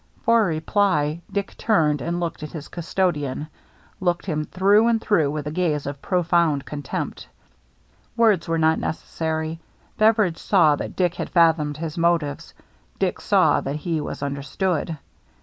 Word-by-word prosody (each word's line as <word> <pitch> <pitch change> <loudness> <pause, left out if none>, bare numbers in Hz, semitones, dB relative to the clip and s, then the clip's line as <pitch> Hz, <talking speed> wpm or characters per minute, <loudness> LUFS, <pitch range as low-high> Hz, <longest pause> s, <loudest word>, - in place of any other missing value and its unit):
For 230 -1 +4
reply, 160 -1 0
Dick 200 -1 -3
turned 155 - +2
and 170 +1 -2
looked 170 -2 -4
at 150 - -7
his 155 -3 -7
custodian, 155 -5 -2 0.5
looked 175 -2 0
him 155 -4 -2
through 200 +6 +3
and 230 -1 +2
through 170 -10 +2
with 150 0 -4
a 150 - -3
gaze 155 -4 -1
of 140 0 -6
profound 170 -5 +1
contempt. 145 -2 -5 0.9
Words 220 -7 +3
were 165 0 0
not 160 0 +3
necessary; 160 0 -3 0.4
Beveridge 215 -6 +3
saw 170 -7 +4
that - - -6
Dick 180 -2 +1
had - - -5
fathomed 160 -4 +3
his 160 0 -5
motives, 165 -4 0 0.4
Dick - - -1
saw - - +3
that 140 +2 -3
he 160 +1 -2
was 145 - -5
understood. 145 +4 -2
165 Hz, 150 wpm, -23 LUFS, 150-180 Hz, 0.9 s, For